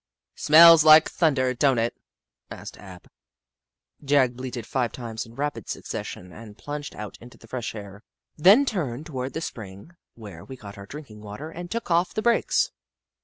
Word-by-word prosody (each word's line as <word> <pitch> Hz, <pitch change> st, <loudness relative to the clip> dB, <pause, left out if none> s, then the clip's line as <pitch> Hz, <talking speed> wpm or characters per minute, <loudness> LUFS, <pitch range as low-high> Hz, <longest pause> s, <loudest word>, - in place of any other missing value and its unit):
" -, -, -66 dB
Smells 165 Hz, +1 st, +9 dB
like 155 Hz, 0 st, +8 dB
thunder, 135 Hz, -6 st, +1 dB
don't 130 Hz, 0 st, +2 dB
it? 115 Hz, +1 st, -1 dB, 0.3 s
" 65 Hz, 0 st, -66 dB
asked -, -, -9 dB
Ab. 95 Hz, -3 st, -13 dB, 1.0 s
Jagg 135 Hz, -3 st, +2 dB
bleated 125 Hz, -2 st, -6 dB
five 120 Hz, -1 st, -2 dB
times 115 Hz, -2 st, -7 dB
in 115 Hz, -, -16 dB
rapid 145 Hz, +2 st, -4 dB
succession 90 Hz, 0 st, -6 dB
and 110 Hz, -2 st, -12 dB
plunged 145 Hz, +6 st, -7 dB
out 105 Hz, -1 st, -8 dB
into 120 Hz, +1 st, -14 dB
the -, -, -17 dB
fresh 120 Hz, -1 st, -5 dB
air, 100 Hz, -1 st, -10 dB, 0.3 s
then 200 Hz, -, +6 dB
turned 150 Hz, -, -3 dB
toward 130 Hz, -4 st, -5 dB
the 160 Hz, -, -4 dB
spring 100 Hz, -, -9 dB, 0.2 s
where 100 Hz, -7 st, -11 dB
we 130 Hz, -, -10 dB
got 100 Hz, -4 st, -11 dB
our 100 Hz, 0 st, -11 dB
drinking 125 Hz, -6 st, -11 dB
water 105 Hz, +10 st, -8 dB
and 175 Hz, +1 st, -8 dB
took 230 Hz, -3 st, -5 dB
off 170 Hz, +2 st, +1 dB
the 215 Hz, -, -2 dB
brakes. 235 Hz, 0 st, +1 dB
130 Hz, 175 wpm, -24 LUFS, 110-155 Hz, 1.0 s, Smells